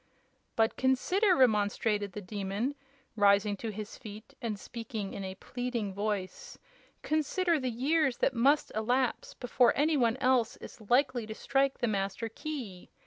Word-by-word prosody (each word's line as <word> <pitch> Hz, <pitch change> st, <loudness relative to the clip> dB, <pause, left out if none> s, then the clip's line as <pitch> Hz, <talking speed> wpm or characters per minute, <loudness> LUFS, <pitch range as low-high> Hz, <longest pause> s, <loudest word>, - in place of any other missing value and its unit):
"But 225 Hz, 0 st, +2 dB
consider," 360 Hz, -, +3 dB
remonstrated 210 Hz, -, +2 dB
the 210 Hz, -, -6 dB
Demon, 200 Hz, +6 st, -3 dB, 0.4 s
rising 205 Hz, 0 st, +4 dB
to 225 Hz, -, -4 dB
his 215 Hz, 0 st, -7 dB
feet 215 Hz, +3 st, -10 dB
and 220 Hz, -4 st, -3 dB
speaking 220 Hz, -2 st, -6 dB
in 195 Hz, -, -5 dB
a 190 Hz, 0 st, -5 dB
pleading 240 Hz, -1 st, -4 dB
voice, 200 Hz, -2 st, -4 dB, 0.5 s
"consider 320 Hz, +2 st, +1 dB
the 260 Hz, -1 st, -1 dB
years 270 Hz, +3 st, +1 dB
that 265 Hz, -, +1 dB
must 275 Hz, +5 st, +3 dB
elapse 245 Hz, +4 st, 0 dB
before 245 Hz, -1 st, +3 dB
any 300 Hz, +2 st, +3 dB
one 235 Hz, -2 st, +2 dB
else 255 Hz, -3 st, +2 dB
is 240 Hz, -, -11 dB
likely 245 Hz, -3 st, +2 dB
to 220 Hz, -, -6 dB
strike 270 Hz, +2 st, +1 dB
the 240 Hz, -, 0 dB
Master 200 Hz, +2 st, -2 dB
Key! 225 Hz, -8 st, -7 dB
230 Hz, 145 wpm, -30 LUFS, 205-265 Hz, 0.5 s, rising